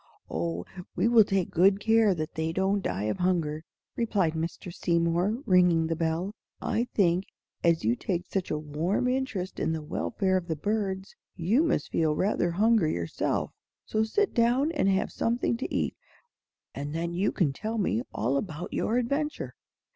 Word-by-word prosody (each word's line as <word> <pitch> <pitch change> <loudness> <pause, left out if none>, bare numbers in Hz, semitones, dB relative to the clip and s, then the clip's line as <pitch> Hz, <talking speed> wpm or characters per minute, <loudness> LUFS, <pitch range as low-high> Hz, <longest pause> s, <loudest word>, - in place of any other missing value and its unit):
"Oh, 85 +1 -2 0.3
we - - +2
will 230 -2 +7
take 195 -3 -1
good 195 +3 +4
care 220 -2 +4
that 155 -2 -4
they 160 0 -1
don't 190 +3 +1
die 100 - -2
of 105 0 -1
hunger," 165 -4 0 0.3
replied 200 -8 +1
Mr. 165 +2 -4
Seymour, 175 +9 +1
ringing 180 -3 +4
the 165 0 -1
bell. 165 +4 -1 0.3
"I 235 - 0
think, 180 -1 +3 0.4
as 170 -1 +3
you 115 +3 +2
take 175 +5 -2
such 190 -2 -2
a 150 - 0
warm 155 +10 -1
interest 250 -8 -2
in 160 - 0
the 160 -1 -4
welfare 190 +5 0
of 175 -2 -4
the 160 - -1
birds, 195 +2 -2 0.2
you 195 - +2
must 320 - 0
feel 155 -2 +2
rather 185 -1 +1
hungry 205 -1 +3
yourself. 85 -1 -1 0.3
So 215 0 +1
sit 405 - +1
down 245 +6 +3
and 290 - +1
have 195 +1 +1
something 235 +1 0
to 255 - -4
eat, - - -1 0.8
and 145 +2 -5
then 170 +1 -2
you 190 +4 +1
can 150 -7 +1
tell 220 +8 -4
me 150 - +1
all 125 +6 0
about 160 0 -5
your 230 - 0
adventure." 280 +5 -1
185 Hz, 170 wpm, -28 LUFS, 160-215 Hz, 0.8 s, will